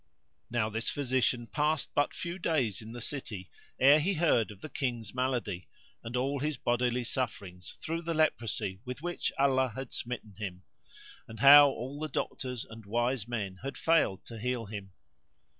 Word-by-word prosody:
Now 115 -2 +1
this 115 +2 -1
physician 130 -3 +1
passed 150 +7 0
but 145 - +2
few 175 +1 -4
days 130 - 0
in 110 +1 -9
the 120 +1 -7
city, 110 -8 -5 0.3
ere 140 +3 +7
he 185 +6 +1
heard 155 -9 +3
of 105 -2 -11
the - - -6
King's 120 -8 -3
malady 120 -8 -1 0.4
and 115 +2 -3
all 135 +3 0
his 150 0 -1
bodily 120 0 +1
sufferings 100 -7 -4
through 165 +1 -2
the 165 -1 -2
leprosy 115 -10 0
with 125 +4 -7
which 175 0 -1
Allah 130 -3 +3
had 130 -2 -6
smitten 120 -4 -4
him; 95 -3 -5 0.6
and 110 - -10
how 145 +1 +10
all 135 +3 -5
the 155 0 -3
doctors 125 -5 -3
and 110 0 -11
wise 120 +2 0
men 100 -6 -3
had 135 +2 -5
failed 160 - +2
to 115 -1 -8
heal 125 0 -1
him. 100 -2 -7
125 Hz, 170 wpm, -31 LUFS, 110-140 Hz, 0.6 s, how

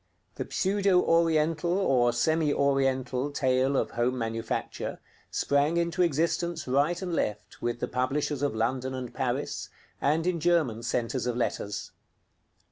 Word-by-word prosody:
The - - -5
pseudo 195 -1 +2
Oriental 165 +1 +2
or 125 -10 +3
semi 155 +4 +2
Oriental 135 -1 +1
tale 130 -1 +1
of - - 0
home 120 +2 0
manufacture 115 -1 -3 0.3
sprang 145 +4 +1
into 170 +1 0
existence 170 0 0
right 145 +7 +2
and 180 -2 -3
left 105 -9 -3
with 120 0 -2
the 125 - -2
publishers 135 +3 -1
of 145 -5 0
London 130 +3 -1
and 125 -2 -6
Paris, - - -2 0.3
and 155 +4 +2
in 180 -2 0
German 155 -9 +2
centres 120 +1 -1
of 120 -1 -1
letters. 105 -4 -2
140 Hz, 135 wpm, -28 LUFS, 125-165 Hz, 0.3 s, or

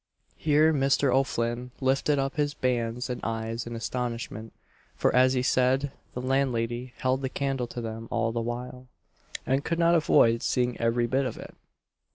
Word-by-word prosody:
Here 155 +1 +3
Mr. 135 -2 +2
O'Flinn 125 -2 0
lifted 135 +2 +2
up 135 0 -1
his 145 -1 0
bands 125 -2 -1
and 125 -2 -4
eyes 115 +1 -3
in 120 - -5
astonishment; 115 -2 -4 0.4
for, - - +1
as 130 +1 +5
he 125 -1 0
said, 130 +2 +2 0.2
the 125 - -3
landlady 125 -2 -1
held 130 +1 0
the 130 - -2
candle 135 -2 -2
to 120 - -6
them 115 0 -6
all 115 -1 0
the 115 0 -2
while, 125 +2 -5 0.6
and 135 +2 +1
could 165 - -1
not 170 0 +4
avoid 115 -8 +4
seeing 125 -1 0
every 115 +1 +2
bit 130 +3 +1
of 120 - -6
it. - - -10
125 Hz, 170 wpm, -27 LUFS, 115-135 Hz, 0.6 s, as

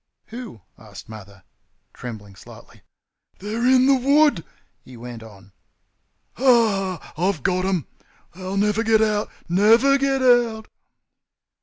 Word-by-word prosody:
"Who?" 230 - -10 0.2
asked 105 -4 -13
Mother, 100 -3 -13 0.5
trembling 105 -5 -10
slightly. - - -16 0.6
"THEY'RE 220 +5 -3
IN 260 0 +4
THE 275 0 +4
WOOD!" 280 - +3 0.4
he 125 -1 -14
went 120 -1 -9
on. 100 -3 -15 0.9
"Ha, 220 -8 +2
ha! - - -17 0.2
I've 165 -10 -4
got 185 0 0
them. 185 -6 -1 0.5
They'll 185 +2 -6
never 210 +2 +1
get 220 -1 +3
out; 210 -1 -1 0.2
NEVER 225 +10 +4
GET 270 -1 0
OUT!" 235 -3 +2
205 Hz, 125 wpm, -21 LUFS, -, 0.9 s, IN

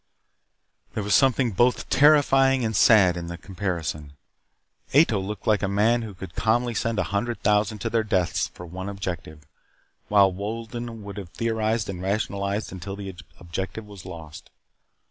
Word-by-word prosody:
There 105 - -1
was 100 0 0
something 130 0 +4
both 120 +6 +2
terrifying 135 -3 +5
and 110 -1 -2
sad 100 -6 +6
in 85 -1 -5
the 85 0 -6
comparison. 85 -7 -4 0.8
Ato 140 -9 +5
looked 95 +1 -6
like 105 -1 +3
a 100 - 0
man 110 +5 +2
who 110 -4 -7
could 95 0 -9
calmly 120 +2 +1
send 115 0 -1
a - - +2
hundred 115 +4 -2
thousand 105 +1 +2
to - - -1
their 115 -1 +2
deaths 95 -5 0
for 90 - -11
one 95 +3 -6
objective, 85 -6 -6 0.6
while 100 -2 +5
Wolden 115 +3 -5
would 100 0 -8
have 95 -4 -7
theorized 110 0 -1
and 90 -2 -5
rationalized 100 +1 -2
until 95 +1 -6
the 100 -2 -7 0.2
objective 95 +5 -5
was 100 -3 -12
lost. 80 -5 -10
100 Hz, 160 wpm, -25 LUFS, 95-115 Hz, 0.8 s, sad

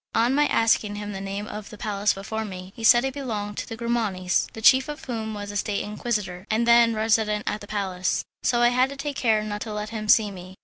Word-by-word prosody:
On 235 +3 +3
my 295 +1 +3
asking 220 -2 +2
him 205 0 -5
the 195 -1 -6
name 195 +1 -4
of 210 -1 -8
a 215 - -10
palace 205 -1 0
before 220 +3 -4
me, 185 -2 -8
he 225 - -9
said 240 +3 +6
it 265 - -2
belonged 215 -7 -4
to - - -6
the 225 - -6
Grimanis, 220 -6 0
the - - -8
chief 260 +4 +6
of 295 - -7
whom 220 -3 -4
was 205 0 -6
a 205 - -3
State 200 0 -1
Inquisitor, 210 -4 -3
and 225 +2 +1
then 235 -1 +6
resident 215 -1 +1
at 210 - -2
the 205 - -10
palace, 190 -3 -1 0.2
so 240 -1 +2
I 240 - +6
had 250 +2 +2
to 280 - -7
take 285 0 -4
care 220 -4 +2
not 210 -1 -5
to 220 - -5
let 210 0 -4
him 215 -2 -5
see 210 -2 +5
me. 185 0 -10
215 Hz, 250 wpm, -25 LUFS, 205-235 Hz, 0.2 s, said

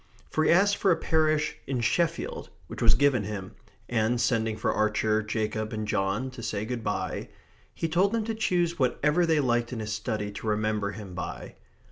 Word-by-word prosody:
For 155 - +1
he - - +3
asked 200 +4 +4
for 195 - +2
a 175 - +5
parish 155 -1 +1
in 130 -2 -1
Sheffield, 165 +7 0 0.2
which - - -8
was 115 -2 +6
given 130 -3 +3
him; 100 -2 -5 0.4
and, 120 +1 +1
sending 115 -3 +1
for - - 0
Archer, 110 0 +1
Jacob, 110 0 -2
and 110 -1 -3
John 100 +6 0
to 130 -2 -9
say 105 -2 -2
good 120 0 -4
bye, 105 -1 -3 0.5
he 165 - -1
told 180 +5 +2
them 230 -1 0
to 225 +1 -2
choose 175 -6 0
whatever 150 +6 +2
they 160 -2 +3
liked 120 -3 +1
in 120 - -4
his 110 -1 -3
study 105 -1 -3
to 100 +2 -7
remember 105 -1 0
him 100 -2 -8
by. 90 - -6
115 Hz, 190 wpm, -27 LUFS, 110-155 Hz, 0.5 s, was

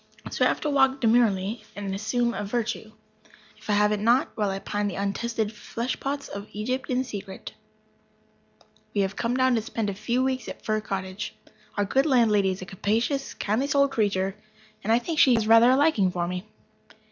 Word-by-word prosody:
So - - 0
I - - +6
have - - -1
to 300 - -1
walk 270 -1 +3
demurely 225 -3 +2
and 200 -1 -4
assume 235 +4 0
a - - -3
virtue, 220 0 -3 0.7
if 215 - -14
I - - +3
have 210 0 +3
it 210 - 0
not, 235 +5 +3
while 210 -2 0
I 195 - -2
pine 205 +1 -2
after 200 - -2
the - - -4
untested 220 +2 -2
flesh 235 +3 -4
pots 280 +1 -3
of 200 +1 -7
Egypt 255 +6 -3
in 255 0 +1
secret. 200 -6 -8 1.4
We 200 - +3
have 195 0 -1
come 240 +2 -1
down 260 0 +3
to 225 - +2
spend 215 -1 -3
a - - -5
few 235 +6 -1
weeks 260 -3 -1
at - - -9
Fir 215 0 0
Cottage. 190 -1 -5 0.4
Our 205 - +2
good 270 +8 +2
landlady 220 -7 +4
is 185 0 -4
a - - -7
capacious, 225 +9 -1
kindly 220 +7 0
souled 280 -1 +3
creature, 195 -4 0 0.5
and 220 - 0
I 230 - +6
think 310 +6 -2
she 255 -3 +6
has 225 -2 +1
rather 230 +2 +7
a 260 - +5
liking 275 - +3
for 175 -1 -2
me. 180 +3 -5
220 Hz, 205 wpm, -26 LUFS, 200-250 Hz, 1.4 s, rather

